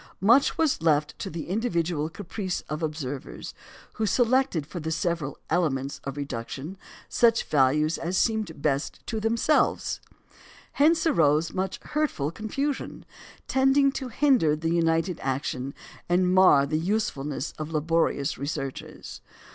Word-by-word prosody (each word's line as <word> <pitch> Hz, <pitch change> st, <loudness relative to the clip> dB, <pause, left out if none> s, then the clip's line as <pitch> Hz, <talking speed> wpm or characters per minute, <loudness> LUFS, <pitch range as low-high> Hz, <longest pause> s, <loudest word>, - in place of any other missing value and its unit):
Much 235 Hz, +8 st, +4 dB
was 315 Hz, -, +1 dB
left 150 Hz, -2 st, +2 dB
to -, -, -4 dB
the 165 Hz, 0 st, -6 dB
individual 170 Hz, -6 st, -1 dB
caprice 185 Hz, +1 st, -4 dB
of 150 Hz, +1 st, -6 dB
observers, 145 Hz, -, -5 dB, 0.4 s
who 220 Hz, -, -1 dB
selected 245 Hz, -, +2 dB
for 175 Hz, +4 st, -7 dB
the 160 Hz, 0 st, -4 dB
several 165 Hz, -3 st, -2 dB
"elements" 140 Hz, -5 st, -1 dB
of 135 Hz, +1 st, -5 dB
reduction 140 Hz, +4 st, -5 dB, 0.3 s
such 230 Hz, -1 st, +3 dB
values 150 Hz, +3 st, +2 dB
as 175 Hz, +3 st, -2 dB
seemed 215 Hz, -10 st, 0 dB
best 140 Hz, -1 st, -1 dB
to 225 Hz, -, -3 dB
themselves. 230 Hz, +7 st, +1 dB, 0.7 s
Hence 320 Hz, +4 st, +3 dB
arose 155 Hz, -, +3 dB
much 190 Hz, 0 st, -2 dB
hurtful 295 Hz, -, -1 dB
confusion, 275 Hz, +9 st, -4 dB, 0.4 s
tending 270 Hz, +1 st, +4 dB
to 265 Hz, -1 st, -5 dB
hinder 250 Hz, -, +3 dB
united 165 Hz, +2 st, 0 dB
action 135 Hz, 0 st, -2 dB, 0.4 s
and 180 Hz, +1 st, +3 dB
mar 185 Hz, -7 st, +6 dB
the 155 Hz, +2 st, -1 dB
usefulness 155 Hz, -7 st, -2 dB
of 155 Hz, +1 st, -5 dB
laborious 155 Hz, -2 st, 0 dB
researches. 140 Hz, -2 st, -6 dB
165 Hz, 125 wpm, -26 LUFS, 150-220 Hz, 0.7 s, mar